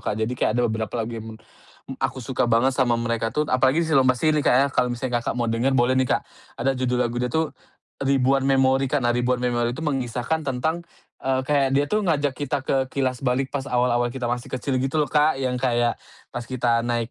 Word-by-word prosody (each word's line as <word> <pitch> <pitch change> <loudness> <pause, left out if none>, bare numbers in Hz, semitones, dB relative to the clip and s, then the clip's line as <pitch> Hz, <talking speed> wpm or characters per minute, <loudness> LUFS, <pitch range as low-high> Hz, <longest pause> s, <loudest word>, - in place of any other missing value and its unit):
Kak. 105 - -1
Jadi 110 +2 -1
kayak 120 -2 0
ada 120 - +2
beberapa 110 -2 -2
lagu 115 - -7
yang 110 -1 -6
men - - -21 0.5
m 135 - -5
aku 135 0 -1
suka 125 0 0
banget 120 +3 +3
sama 125 -3 +2
mereka 115 -1 -1
tuh 150 - +1
apalagi 130 +5 +3
di - - -4
si 160 - -1
Lomba 130 -1 +4
Sihir 155 +5 +2
nih 150 - 0
Kak - - +4
ya, 135 +2 +4
kalo 125 - +2
misalnya 120 0 -2
Kakak 120 - -3
mau 120 -1 0
denger 125 +4 +1
boleh 120 +1 +3
nih 130 - 0
Kak, - - -8 0.3
ada 135 +3 +1
judul 125 -1 -1
lagu 120 0 -3
dia 125 - 0
tuh, 160 +4 -1 0.5
"Ribuan 135 0 +2
Memori," 135 0 +3
karena 125 -4 +1
"Ribuan 125 +1 0
Memori" 120 -1 0
itu - - -6
mengisahkan 135 +1 -1
tentang, 150 +5 -1 0.4
eee, 130 0 0
kayak 140 -1 +2
dia 145 - +3
tuh 215 - +1
ngajak 145 -5 +1
kita 145 0 -2
ke 135 - +1
kilas 130 -2 -2
balik 130 0 0
pas 140 -2 -2
awal-awal 120 -1 +1
kita 125 +1 -6
masih 120 0 -3
kecil 130 +1 -1
gitu 135 +3 -1
loh 150 -2 +1
Kak, 150 0 +3
yang 130 -1 -1
kayak 120 -2 +1 0.4
pas 120 0 -5
kita 120 -2 +1
naik, 120 -1 -1
130 Hz, 230 wpm, -23 LUFS, 120-135 Hz, 0.5 s, Lomba